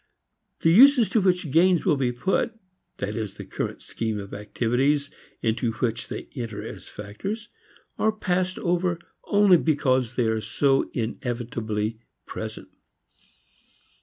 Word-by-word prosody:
The 165 - +4
uses 250 +3 +7
to 220 - +2
which 180 -5 +1
gains 175 +3 +4
will 170 -6 +4
be 130 -3 0
put, 190 - 0 0.4
that 105 +2 -3
is 110 -4 -4
the - - -8
current - - -4
scheme 110 -2 -3
of 100 -1 -7
activities 125 +8 0 0.3
into 115 +1 0
which 115 0 -2
they - - -6
enter 115 -5 -5
as - - -9
factors, 195 - -6 0.5
are 220 - +3
passed 185 -3 -1
over 175 0 0 0.3
only 205 -3 +5
because 130 -6 +1
they 120 - +2
are 110 0 0
so 135 +4 +1
inevitably 115 -3 -3 0.3
present. - - -7
135 Hz, 135 wpm, -25 LUFS, 115-180 Hz, 0.5 s, uses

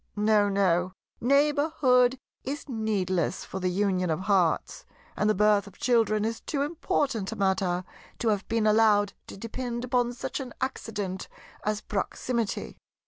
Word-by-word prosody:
No, 210 -1 +3
no; 185 -2 +2 0.3
neighbourhood 280 -2 +3 0.3
is 285 +3 -5
needless 195 - -1
for 190 - -5
the 185 -1 0
union 185 -1 0
of 160 +2 -1
hearts; 190 -4 +1 0.3
and 210 - +1
the 215 - +3
birth 210 0 +3
of 200 - -14
children 225 -3 +2
is 225 0 -3
too 280 -3 -1
important 290 - -1
a - - -4
matter 190 -2 +1 0.3
to 230 - 0
have 205 -2 0
been 225 -1 +1
allowed 210 -2 +4
to - - -9
depend 240 +3 -4
upon 245 -1 +1
such 245 - -4
an 255 -3 -7
accident 205 -7 -4 0.4
as 215 0 -1
proximity. 230 +2 -3
215 Hz, 145 wpm, -27 LUFS, 195-245 Hz, 0.4 s, allowed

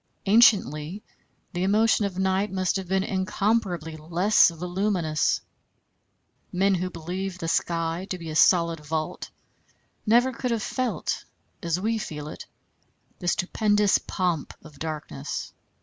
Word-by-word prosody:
Anciently 195 -5 +4 0.5
the 175 - -2
emotion 210 +3 +3
of 190 -2 -4
night 190 +1 +1
must 185 -1 0
have 190 -2 -5
been 190 +1 +1
incomparably 190 -4 -1
less 175 +8 +4
voluminous. 175 -1 0 1.1
Men 195 +2 +2
who 185 0 -1
believed 185 +2 -5
the 165 - -3
sky 165 +2 -1
to 185 - -2
be 165 -2 -7
a - - -5
solid 170 0 +4
vault, 155 +1 -3 0.7
never 240 +4 +4
could 250 +1 -3
have 230 -2 -1
felt, 255 -3 -2 0.4
as 170 +1 -1
we 220 +3 0
feel 150 -7 -6
it, - - -9 0.7
the 175 - -6
stupendous 205 +3 +2
pomp 175 -6 -2
of 150 -3 -14
darkness. 155 - -5
185 Hz, 130 wpm, -26 LUFS, 165-205 Hz, 1.1 s, Anciently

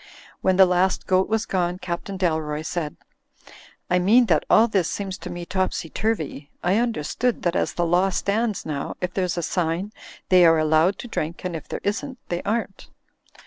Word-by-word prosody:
When 190 - +2
the 190 0 +7
last 180 +1 +1
goat 185 +1 +2
was 220 0 0
gone, 180 -1 -1
Captain 185 +2 -5
Dalroy 155 -4 -1
said: 155 -3 -3 0.9
"I 180 - +2
mean 225 +7 +5
that - - +2
all 230 - +6
this 190 -7 +1
seems 195 -2 -4
to - - -7
me 175 0 -6
topsy 185 -3 -2
turvy. 160 -9 -2
I 185 +5 +3
un 240 -1 +1
derstood 230 +7 -2
that 175 -1 0
as - - 0
the 175 - 0
law 180 +3 +3
stands 210 +3 -1
now, 145 -3 -4
if 180 0 -3
there's 180 -2 -1
a 175 - -1
sign 175 +4 -1 0.4
they 185 -1 +6
are 165 -1 +6
allowed 155 +4 +3
to - - -8
drink 170 -5 -4
and 180 -2 -3
if 160 - -7
there - - -5
isn't 260 +7 -2
they 175 0 -2
aren't." 210 -2 -3
180 Hz, 190 wpm, -23 LUFS, 170-200 Hz, 0.9 s, the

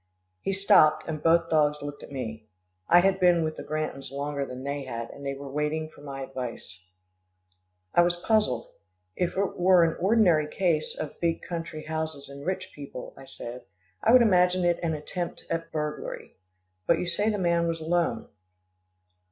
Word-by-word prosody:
He 195 - -1
stopped, 195 -5 +5
and 155 -2 -4
both 165 0 +4
dogs 150 -2 +2
looked 145 0 -6
at - - -11
me. 110 -5 -6 0.4
I 175 +1 +8
had 195 +1 +2
been 175 -2 +4
with 155 0 -2
the - - -7
Grantons 155 -4 -4
longer 140 0 -3
than 125 +1 -7
they 140 0 -3
had, 115 -2 -5
and 140 - -11
they 140 0 -2
were 140 +1 -8
waiting 150 +3 -2
for 155 - -17
my 135 -2 -6
advice. 125 -8 -7 1.1
I 175 - +6
was 175 0 +3
puzzled. 215 +4 +1 0.4
"If 180 +1 -1
it 195 -1 -1
were 180 -1 +6
an 165 -1 +1
ordinary 180 -6 +4
case 160 -1 0
of 155 - -6
big 165 -1 0
country 165 -2 -5
houses 160 -3 -4
and 140 0 -9
rich 185 - -2
people," 140 -3 -8
I 135 - -12
said, 125 -1 -8 0.4
"I 225 - +4
would 250 0 +8
imagine 180 -3 +4
it 175 -1 +2
an 165 -2 0
attempt 170 +3 -5
at 165 0 -2
burglary. 150 -1 -4 0.5
But 170 - +4
you - - -2
say 180 +5 +1
the 210 - 0
man 170 -2 +2
was 165 0 -2
alone." 170 +2 0
160 Hz, 180 wpm, -27 LUFS, 140-175 Hz, 1.1 s, I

